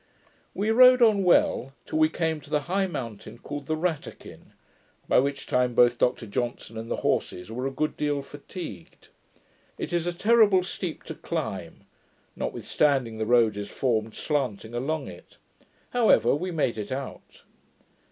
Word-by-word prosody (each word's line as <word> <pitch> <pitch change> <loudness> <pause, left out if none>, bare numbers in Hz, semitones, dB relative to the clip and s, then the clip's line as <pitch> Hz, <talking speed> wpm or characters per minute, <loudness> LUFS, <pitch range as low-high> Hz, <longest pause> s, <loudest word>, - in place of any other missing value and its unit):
We 210 +3 0
rode 250 +1 +7
on 210 -4 +4
well, 135 -6 +3
till 155 - -2
we 155 0 +5
came 160 -1 -2
to - - -15
the 150 -1 +1
high 190 +5 0
mountain 115 - -7
called 145 +2 -7
the 155 - -1
Rattakin, 165 -2 -5 0.5
by - - +4
which 140 +1 -1
time 125 -1 +1
both 120 -1 +4
Dr 125 -1 +1
Johnson 115 +1 -4
and 115 +1 -6
the - - 0
horses 90 +4 -1
were 125 +3 -3
a - - -3
good 155 +3 -2
deal 145 -1 -1
fatigued. 145 - -10 0.7
It - - -5
is 175 0 0
a - - +1
terrible 205 -1 +4
steep 180 -2 -5 0.2
climb, - - -5 0.5
notwithstanding 130 -7 0
the 110 - -1
road 115 -3 +4
is 100 0 -5
formed 110 -4 -1
slanting 125 -7 -2
along 140 +6 -2
it; - - -13 0.5
however, 220 - +4
we 180 +6 -2
made 145 -10 -1
it 105 +2 -6
out. 135 0 -7
140 Hz, 155 wpm, -26 LUFS, 120-175 Hz, 0.7 s, rode